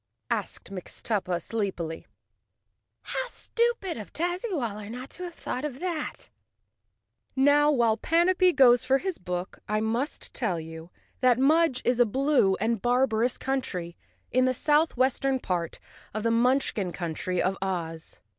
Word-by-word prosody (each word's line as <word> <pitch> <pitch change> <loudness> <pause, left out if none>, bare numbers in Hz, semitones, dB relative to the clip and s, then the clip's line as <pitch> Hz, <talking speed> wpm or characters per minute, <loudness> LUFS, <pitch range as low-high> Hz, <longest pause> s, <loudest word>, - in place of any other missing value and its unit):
asked - - -3
Mixtuppa 185 -1 -3
sleepily. 180 -5 -4 1.0
"How - - -3
stupid 470 - -1
of 210 - -8
Tazzywaller 315 - -2
not 250 +3 -7
to 360 - -7
have 345 -1 -8
thought 255 - -4
of 280 -3 -4
that." 345 -3 -4 1.0
Now, 285 +2 +5
while 235 -6 +3
Panapee 360 +4 +3
goes 245 -6 +6
for 270 - +3
his 375 +4 -4
book, 180 +1 -5
I 215 0 +1
must 230 +7 -2
tell 190 -9 -1
you 160 +1 -9 0.3
that 250 -2 +4
Mudge 290 0 +3
is 245 0 +2
a 245 - +5
blue 265 -5 +3
and 220 +1 -1
barbarous 245 -1 +2
country 185 -11 -3 0.4
in 255 +1 +3
the 255 0 +1
southwestern 270 -2 +2
part 175 -8 -3 0.4
of 215 - -2
the 230 - +2
Munchkin 230 -5 +2
country 175 +1 -3
of 190 +1 +1
Oz. 165 -4 -4
245 Hz, 135 wpm, -27 LUFS, 195-290 Hz, 1.0 s, goes